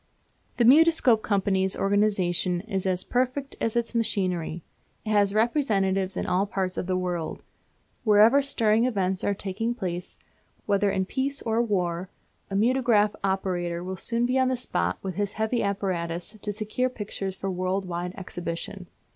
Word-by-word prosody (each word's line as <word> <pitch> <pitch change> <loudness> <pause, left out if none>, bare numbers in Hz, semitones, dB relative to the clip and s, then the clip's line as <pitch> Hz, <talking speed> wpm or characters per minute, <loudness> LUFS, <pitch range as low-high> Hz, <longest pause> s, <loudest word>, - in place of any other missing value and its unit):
The 240 - +3
Mutoscope 280 -4 +6
Company's 190 -2 +1
organisation 195 -3 +1
is 195 -2 -3
as 185 -1 0
perfect 255 +3 -1
as 225 - 0
its 235 0 0
machinery. 180 -7 -1 0.4
It 215 - -2
has 205 -1 +3
representatives 200 -5 +1
in - - -1
all 185 +3 +1
parts 190 -2 -2
of - - -3
the 185 -1 +1
world. 175 -3 -3 0.6
Wherever 220 +5 +6
stirring 230 -4 +2
events 190 -6 0
are 200 - +1
taking 205 +5 -3
place, 180 -5 -5 0.5
whether 200 0 +2
in 190 -1 0
peace 275 +6 -2
or 225 0 +1
war, 180 -5 -1 0.4
a 195 - -4
mutograph 225 -2 +3
operator 180 -3 -1
will 185 +1 -4
soon 230 +5 0
be 255 +2 +1
on 260 - +3
the 255 0 0
spot 90 - -1
with 190 -1 -3
his 205 -1 -1
heavy 220 +2 0
apparatus 185 -2 -2
to 205 - -2
secure 215 +5 -1
pictures 200 -5 -5
for 195 0 -3
world 185 +1 -1
wide 175 +1 -4
exhibition. 180 +1 -6
200 Hz, 155 wpm, -26 LUFS, 185-230 Hz, 0.6 s, Mutoscope